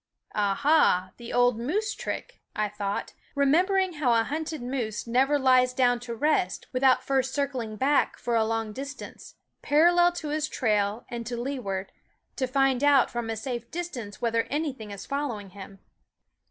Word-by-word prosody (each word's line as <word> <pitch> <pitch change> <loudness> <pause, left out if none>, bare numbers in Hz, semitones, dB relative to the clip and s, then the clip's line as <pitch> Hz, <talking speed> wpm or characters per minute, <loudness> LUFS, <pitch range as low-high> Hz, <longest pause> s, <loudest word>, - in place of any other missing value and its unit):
"Aha! 205 - +3
the 235 -1 -8
old 245 -2 +3
moose 410 - -1
trick," - - -6
I 215 -1 0
thought, 200 -1 -4 0.2
remembering 360 +7 +3
how 270 -6 +2
a - - +2
hunted 310 +1 -4
moose 245 -4 -3
never 265 +5 +2
lies 255 -2 +4
down 245 -2 +3
to 235 -1 -6
rest 225 -9 0
without 255 0 +3
first 265 -1 0
circling 260 -6 -2
back 275 +6 +2
for 240 -1 -2
a 225 - +4
long 225 -1 -2
distance, 275 +4 -8 0.3
parallel 345 +4 +4
to 330 -3 -5
his 305 0 -1
trail 210 -1 0
and 235 -1 -4
to 240 0 -3
lee 270 +2 -3
ward, 195 -4 -4 0.5
to 260 - 0
find 270 0 +2
out 285 -3 +5
from 240 -1 -3
a 225 - -2
safe 240 +1 -5
distance 260 - -6
whether 230 -1 +1
anything 280 -7 -3
is 200 -1 -8
following 245 -9 -3
him. 195 0 -11
250 Hz, 165 wpm, -27 LUFS, 225-285 Hz, 0.5 s, out